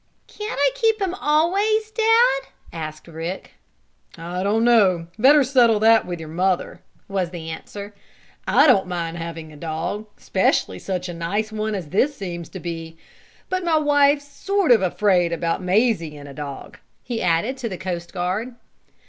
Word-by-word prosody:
"Can't 425 +1 -6
I - - +4
keep 450 -3 +1
him 380 -3 -1
always, 390 +7 +1
Dad?" 450 - +3 0.3
asked 155 -1 -7
Rick. 165 +3 -6 0.7
"I 175 +2 -5
don't 210 +4 +1
know. 200 -8 +4
Better 280 +5 +6
settle 240 -4 +4
that 225 -1 +5
with 175 -1 -4
your 160 - -8
mother," 180 +3 -1 0.3
was 190 -3 -1
the 165 -2 -7
answer. 200 +5 -8 0.5
"I 285 - +5
don't 235 -10 +4
mind 170 -2 -3
having 165 -2 -7
a - - -12
dog, 165 +7 -4
'specially 190 - 0
such 185 -1 -3
a 175 - -5
nice 200 +6 -2
one 215 0 -2
as 175 -6 -5
this 270 - +1
seems 175 -4 -6
to 190 - -8
be. 165 -1 -6 0.5
But 370 0 -2
my 335 -2 +2
wife's 290 -1 +3
sort 390 +3 0
of 230 - +6
afraid 185 -2 +2
about 170 +1 -1
Mazie 185 -5 +1
and 145 0 -10
a 140 - -10
dog," 140 -1 -8 0.2
he 235 -2 -4
added 175 +9 +1
to 245 -3 -4
the 185 - -5
coast 175 -2 -5
guard. 195 +7 -3
195 Hz, 165 wpm, -22 LUFS, 170-270 Hz, 0.7 s, Better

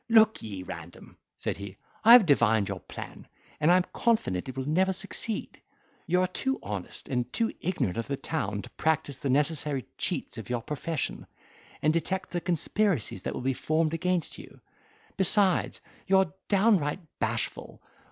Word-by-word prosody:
"Look 220 -1 +5
ye, 100 -4 -6
Random," 85 -2 -10 0.2
said - - -3
he, 100 -1 -8 0.3
"I 230 +2 +9
have 245 -5 +9
divined 115 - +3
your - - -4
plan, - - -9 0.3
and 150 +2 +3
am 180 +1 +5
confident 135 - 0
it 130 - -8
will 135 0 -3
never 185 +5 +2
succeed. 200 +3 -3 0.5
You 180 +2 +3
are 185 - +2
too 265 +9 -2
honest 100 -3 -5
and 125 -2 -2
too 230 -1 0
ignorant 145 - -1
of 115 - -3
the 140 - -2
town 105 -12 -3
to - - -10
practise 155 -4 0
the 135 - -2
necessary 145 -2 +1
cheats - - -2
of - - -9
your 120 -2 -2
profession, 150 +2 -4 0.6
and 155 - +4
detect 190 +3 -2
the 175 - -2
conspiracies 180 - 0
that - - -4
will - - -4
be 135 +1 +1
formed 155 +4 0
against 180 0 -1
you. - - -13 0.6
Besides, 190 -1 +4 0.3
you 190 0 +5
are 190 -5 +2 0.2
downright 195 -6 +3 0.2
bashful. - - -3
160 Hz, 165 wpm, -28 LUFS, 125-190 Hz, 0.6 s, I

